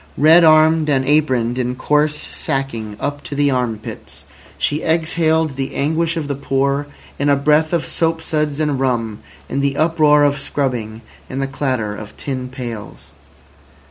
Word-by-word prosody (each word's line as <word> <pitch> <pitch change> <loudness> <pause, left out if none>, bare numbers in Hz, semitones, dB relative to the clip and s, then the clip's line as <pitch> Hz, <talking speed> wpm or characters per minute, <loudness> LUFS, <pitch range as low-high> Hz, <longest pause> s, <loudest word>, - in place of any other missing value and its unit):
Red 160 +4 +6
armed, 155 0 +5
and 135 -2 +2
aproned 130 -5 +2
in 125 0 -1
coarse 150 +3 +1 0.2
sacking 115 -6 -3
up 145 0 -3
to 145 - -7
the 145 0 +2
arm 125 -4 0
pits, 105 - -10 0.3
she 150 +2 -1
exhaled 160 -2 +1
the 135 -1 -4
anguish 160 +4 0
of 155 -3 -3
the 145 - -1
poor 140 +1 -1 0.3
in 145 +1 +1
a 140 - +5
breath 150 +3 +2
of 170 -3 0
soap 165 0 0
suds 150 -2 -2
and 150 -3 0
rum, 115 -5 -1 0.3
in - - -2
the 140 0 0
uproar 155 -2 +4
of 145 -1 +2
scrubbing, 120 -6 -3 0.3
in 130 - -5
the 135 - 0
clatter 130 -6 -2
of 105 0 -10
tin 130 -2 -4
pails. 120 -7 -8
140 Hz, 165 wpm, -18 LUFS, 130-155 Hz, 0.3 s, Red